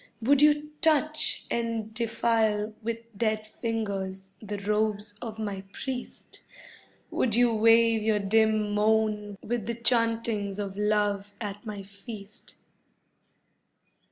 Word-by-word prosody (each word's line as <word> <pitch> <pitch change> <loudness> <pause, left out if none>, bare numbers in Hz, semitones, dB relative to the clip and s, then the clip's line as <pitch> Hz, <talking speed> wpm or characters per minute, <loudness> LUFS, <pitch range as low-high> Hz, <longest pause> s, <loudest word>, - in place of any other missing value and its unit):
Would 270 +4 +3
you 300 0 +4
touch 310 -1 +2
and 230 -2 -2
defile 220 -2 +1
with 230 0 -5
dead 215 0 0
fingers 195 -4 -4
the 205 -1 -5
robes 210 0 -1
of 225 -3 -6
my 205 -3 -3
priest? 260 -2 -6 0.7
Would 230 -4 +1
you 240 -1 +4
weave 225 0 +5
your 215 0 +2
dim 215 +1 +2
moan 210 -1 +1
with 230 -2 -2
the 235 - -1
chantings 230 -4 0
of 200 -2 -4
love 205 -1 0
at 205 0 -6
my 205 -2 -5
feast? 200 +1 -10
220 Hz, 115 wpm, -28 LUFS, 205-230 Hz, 0.7 s, weave